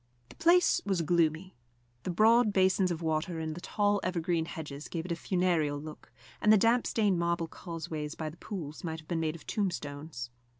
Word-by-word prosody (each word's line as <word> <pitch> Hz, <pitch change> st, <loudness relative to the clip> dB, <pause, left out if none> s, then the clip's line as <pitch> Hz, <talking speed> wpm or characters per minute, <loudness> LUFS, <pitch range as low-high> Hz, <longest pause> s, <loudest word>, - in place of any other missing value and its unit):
The -, -, -14 dB
place 345 Hz, +2 st, +4 dB
was 190 Hz, -4 st, 0 dB
gloomy. 170 Hz, +2 st, +1 dB, 0.5 s
The -, -, -2 dB
broad 220 Hz, +5 st, +5 dB
basins 190 Hz, -1 st, +3 dB
of 170 Hz, -1 st, -3 dB
water 160 Hz, +2 st, -1 dB
and 160 Hz, -1 st, -3 dB
the 170 Hz, -, -8 dB
tall 205 Hz, +1 st, +1 dB
evergreen 170 Hz, -2 st, 0 dB
hedges 150 Hz, -3 st, -7 dB
gave 165 Hz, -1 st, -4 dB
it 180 Hz, -, -5 dB
a -, -, +1 dB
funereal 170 Hz, -5 st, +1 dB
look, 155 Hz, +1 st, -10 dB, 0.3 s
and 210 Hz, -, +5 dB
the 215 Hz, -, +8 dB
damp 230 Hz, +4 st, +3 dB
stained 205 Hz, -5 st, +2 dB
marble 170 Hz, -1 st, 0 dB
causeways 160 Hz, -3 st, -6 dB
by 155 Hz, -1 st, -4 dB
the 165 Hz, -, -15 dB
pools 160 Hz, -9 st, -7 dB
might 160 Hz, -2 st, -3 dB
have 155 Hz, -, -16 dB
been 170 Hz, -2 st, -1 dB
made 160 Hz, 0 st, -1 dB
of 165 Hz, -, -12 dB
tombstones. 145 Hz, -, -3 dB
170 Hz, 190 wpm, -30 LUFS, 155-190 Hz, 0.5 s, the